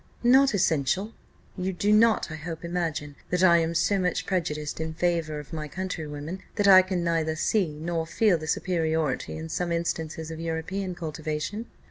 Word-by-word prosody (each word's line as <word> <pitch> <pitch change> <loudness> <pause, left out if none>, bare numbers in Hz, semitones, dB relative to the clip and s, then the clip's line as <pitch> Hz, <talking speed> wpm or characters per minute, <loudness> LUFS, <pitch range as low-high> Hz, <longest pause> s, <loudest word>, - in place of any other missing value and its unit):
"Not 265 0 +5
essential. 180 - +1 0.4
You 190 0 -2
do 205 +4 +2
not, 220 -5 +4
I - - -4
hope, 165 +2 -6
imagine 165 -4 -3
that 180 +1 +1
I 170 -2 +7
am 165 0 -1
so 195 +4 +2
much 180 -2 0
prejudiced 150 -6 -2
in 160 0 -4
favour 165 -3 0
of 150 +3 -11
my 155 -1 -4
countrywomen, 160 -1 -5
that 205 -2 +2
I 190 -1 +10
can 185 -2 -2
neither 165 -2 0
see 190 +4 +1
nor 165 +1 -3
feel 185 0 +2
the 155 - -7
superiority 160 -5 -1
in 160 0 -6
some 170 +2 -2
instances 160 -1 -2
of 160 - -7
European 175 +3 -3
cultivation? 160 +6 -4
170 Hz, 170 wpm, -26 LUFS, 160-185 Hz, 0.4 s, I